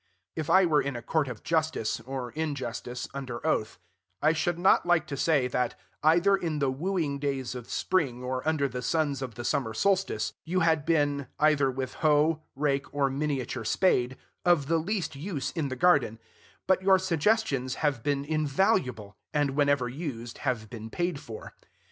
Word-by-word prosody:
If 155 -2 -3
I 190 0 +6
were 155 -3 +3
in 140 -2 -3
a 120 - -6
court 155 +3 0
of 120 -4 -7
justice, 160 -10 0
or 125 +1 -5
injustice, 125 -5 -4
under 130 -2 -6
oath, 110 -9 0 0.4
I 155 +2 +3
should 165 +2 0
not 180 +2 +4
like 175 -3 +2
to 140 - -5
say, 140 -2 +2
that, 125 -5 -1 0.2
either 170 +6 +5
in 165 -5 -2
the 140 -2 +1
wooing 155 -1 -1
days 135 -3 -2
of 125 -2 -8
spring, 135 -9 0
or 130 0 -2
under 155 -3 +2
the 125 -1 -5
suns 145 0 0
of 125 -4 -5
the 120 - -6
summer 110 -4 -1
solstice, 195 - +1
you 180 +3 0
had 160 -2 +2
been, 145 -4 +1
either 150 -3 +4
with 130 0 -4
hoe, 155 +1 +3
rake, 140 0 0
or 140 -2 +1
miniature 135 -4 -2
spade, 125 - +2 0.3
of 175 -6 +3
the 165 +3 +2
least 180 -2 -2
use 145 -3 -4
in 160 -4 -2
the 130 - -3
garden; 135 -6 +3 0.5
but 190 0 +3
your 190 0 +5
suggestions 175 - +1
have 140 -5 +1
been 140 +1 -1
invaluable, 145 - 0 0.2
and, 145 -2 +2
whenever 140 -2 +2
used, 125 -4 -6
have 125 -6 -2
been 110 0 -8
paid 175 +1 -2
for. 115 -7 -9
145 Hz, 175 wpm, -28 LUFS, 130-165 Hz, 0.5 s, I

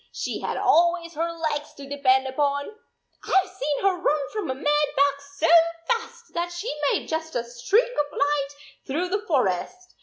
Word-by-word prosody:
She - - -4
had - - -3
always 340 +1 +3
her 335 +2 -1
legs 310 -3 -3
to 280 -1 -10
depend 265 -2 +2
upon! 285 +1 0 0.5
I 385 - +4
Ve - - -12
seen 300 -6 -2
her 375 -3 +2
run 290 -4 +1
from 420 -7 -3
a 260 - -1
mad 295 +2 +2
buck 280 0 +2 0.2
so 320 - +2 0.4
fast 465 0 -3
that 345 +1 -2
she 345 +2 -4 0.2
made - - -1
just 320 -1 -3
a 240 - 0
streak 245 - +2
of 295 -5 -2
light 285 -1 +1 0.4
through 335 +7 -1
the 405 +2 0
forest. 290 - -1
300 Hz, 180 wpm, -25 LUFS, 280-350 Hz, 0.5 s, I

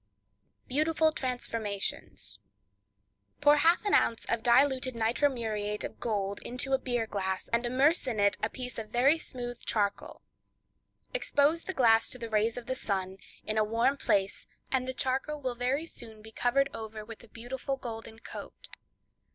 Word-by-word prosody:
Beautiful 315 +3 +2
Transformations.—Pour 245 +4 -3
half 335 +7 +4
an 410 - +1
ounce 230 - +3
of 230 - 0
diluted 255 +1 +3
nitro 230 +6 +2
muriate 210 -4 -2
of - - -6
gold 200 -4 -1
into 250 +2 -2
a 265 - +4
beer 245 -3 -1
glass, 190 -3 -2
and 235 +1 +2
immerse 275 +7 +3
in 230 -4 -1
it 200 0 +4
a 215 - +1
piece 250 -1 -6
of 215 -1 -6
very 270 +8 +4
smooth 245 -4 -7
charcoal. 205 -2 -1 0.9
Expose 320 -9 +2
the 375 - -4
glass 225 -3 +5
to - - -3
the 230 -2 -6
rays 220 +2 +2
of 245 - -5
the 260 - -1
sun, 190 -6 -2 0.3
in 215 0 0
a - - +4
warm 230 +6 +2
place, 195 -7 0 0.2
and 255 -1 +1
the 260 - -2
charcoal 265 +4 -1
will 260 -3 -2
very 255 +6 0
soon 220 -8 -8
be 220 - -11
covered 275 +5 +2
over 220 -1 -7
with 230 +1 -10
a - - -14
beautiful 260 +4 -4
golden 225 -3 -7
coat. - - -10
240 Hz, 160 wpm, -30 LUFS, 220-270 Hz, 0.9 s, glass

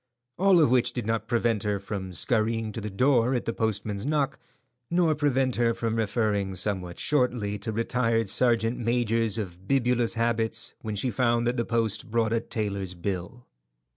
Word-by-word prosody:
All 190 -2 +5
of 150 -7 +4
which 125 -2 +3
did 125 - -3
not 115 0 -1
prevent 115 -3 +1
her 105 -1 -1
from 100 -1 -5
scurrying 110 +4 0
to 115 - -6
the 105 - -4
door 125 +4 +2
at 120 - -2
the 115 - -1
postman's 105 -2 -2
knock, 145 0 0 0.5
nor 170 -2 +3
prevent 135 -4 +1
her 115 -1 +2
from 115 -1 -2
referring 105 -3 0
somewhat 90 -2 -2
shortly 120 -8 0
to 105 +3 -4
retired 115 0 0
sergeant 115 +2 +2
majors 115 -2 0
of 95 -3 -6
bibulous 125 -3 +1
habits 115 -1 -1
when 110 -1 -4
she 120 +5 0
found 120 -2 +1
that 120 +1 +1
the 120 -2 -1
post 115 +1 -1
brought 115 0 +1
a 115 - +2
tailor's 100 -5 -3
bill. 95 +7 -5
115 Hz, 170 wpm, -27 LUFS, 105-125 Hz, 0.5 s, All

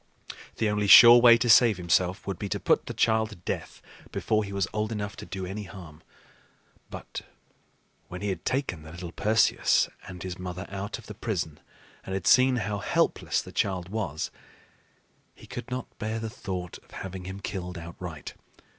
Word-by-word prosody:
The 110 - 0
only 105 0 0
sure 120 +5 +10
way 120 -1 +8
to 120 - -1
save 115 -2 +6
himself 90 +2 +1
would 95 -3 -4
be 100 - -4
to - - -2
put - - +1
the - - -4
child 110 -1 +2
to 105 - -10
death 85 - -6 0.3
before 110 0 0
he 100 - -7
was 100 -2 0
old 110 +1 -1
enough 105 -2 -4
to - - -9
do 95 -1 -5
any 100 +3 -5
harm. 85 -5 -11 0.9
But - - -7 0.9
when 90 +1 -8
he 105 - -1
had 95 - -4
taken 130 - -2
the 80 - -11
little 85 0 -7
Perseus 110 +4 +2 0.2
and 90 -2 -8
his 90 -1 -6
mother 90 0 -5
out 100 +2 -5
of - - -14
the 105 - -8
prison 90 -8 -3 0.4
and 95 - -4
had 95 - -4
seen 130 0 +5
how 105 -3 -2
helpless - - 0
the - - -11
child 95 -2 -1
was, 95 -8 -3 1.0
he - - -15
could - - -7
not 125 0 -3
bear 110 +1 -2
the 110 -1 -4
thought 95 -7 -6
of - - -29
having 95 -1 -7
him 95 +1 -6
killed 90 -3 -5
outright. 85 -2 -8
100 Hz, 185 wpm, -27 LUFS, 90-110 Hz, 1.0 s, sure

